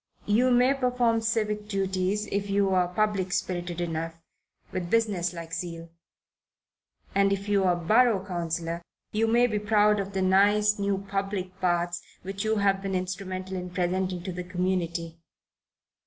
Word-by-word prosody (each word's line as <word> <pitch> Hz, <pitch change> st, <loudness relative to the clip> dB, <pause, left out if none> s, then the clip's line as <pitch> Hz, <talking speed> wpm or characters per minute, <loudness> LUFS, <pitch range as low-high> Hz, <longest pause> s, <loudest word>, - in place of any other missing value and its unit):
You 230 Hz, +5 st, +3 dB
may 250 Hz, +2 st, +4 dB
perform 250 Hz, -4 st, +1 dB
civic 215 Hz, -2 st, -1 dB
duties, 195 Hz, 0 st, -1 dB
if 200 Hz, 0 st, -1 dB
you 200 Hz, -1 st, +2 dB
are 180 Hz, -1 st, +3 dB
public 195 Hz, 0 st, 0 dB
spirited 175 Hz, -2 st, -2 dB
enough, 165 Hz, -1 st, -3 dB, 0.6 s
with 175 Hz, -2 st, -3 dB
business 205 Hz, -6 st, +1 dB
like 170 Hz, -1 st, -8 dB
zeal, 170 Hz, -1 st, -5 dB, 1.2 s
and 195 Hz, 0 st, +3 dB
if 200 Hz, +1 st, -2 dB
you 200 Hz, -2 st, +2 dB
are 180 Hz, -1 st, +3 dB
borough 215 Hz, +3 st, +3 dB
councillor 170 Hz, -2 st, -3 dB, 0.3 s
you 220 Hz, +1 st, +1 dB
may 240 Hz, +2 st, +4 dB
be 215 Hz, -3 st, 0 dB
proud 210 Hz, 0 st, +3 dB
of 200 Hz, 0 st, -4 dB
the 190 Hz, -1 st, 0 dB
nice 205 Hz, +2 st, +4 dB
new 200 Hz, -1 st, -1 dB
public 195 Hz, -1 st, -3 dB
baths 175 Hz, -1 st, 0 dB, 0.2 s
which 195 Hz, +2 st, -4 dB
you 220 Hz, 0 st, +1 dB
have 195 Hz, -2 st, +2 dB
been 195 Hz, -1 st, -2 dB
instrumental 185 Hz, 0 st, -4 dB
in 180 Hz, -1 st, -4 dB
presenting 180 Hz, 0 st, -1 dB
to 185 Hz, -, -4 dB
the 180 Hz, 0 st, -5 dB
community. 175 Hz, -2 st, -2 dB
190 Hz, 155 wpm, -27 LUFS, 180-210 Hz, 1.2 s, may